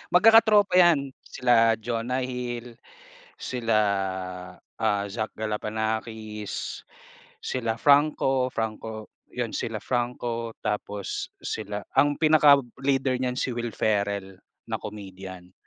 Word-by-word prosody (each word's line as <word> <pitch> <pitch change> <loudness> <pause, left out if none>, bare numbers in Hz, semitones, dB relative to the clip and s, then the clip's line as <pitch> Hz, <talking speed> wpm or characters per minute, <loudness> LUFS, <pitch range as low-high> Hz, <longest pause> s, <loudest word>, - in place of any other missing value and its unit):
Magkaka-tropa 215 0 +6
yan, 150 -6 +4
sila 115 -3 +3
Jonah 120 +3 -2
Hill, 120 -2 -5 0.6
sila 115 -3 -1 0.8
ah 105 -3 -2
Zach 110 +2 -4
Galifianakis, 110 0 -3 0.6
sila 115 -3 -2
Franco 140 -3 +3
Franco 110 -1 -4 0.2
yun, - - -4
sila - - -3
Franco 120 -1 -2
tapos 105 -2 -3
sila 105 0 -5
ang 145 +2 +3
pinaka-leader 140 -4 +4
niyan 125 0 -1
si 130 - -1
Will 120 -1 -3
Ferrell 100 -3 -1 0.2
na - - -2
comedian. 95 -3 -9
115 Hz, 95 wpm, -26 LUFS, 110-130 Hz, 0.8 s, Magkaka-tropa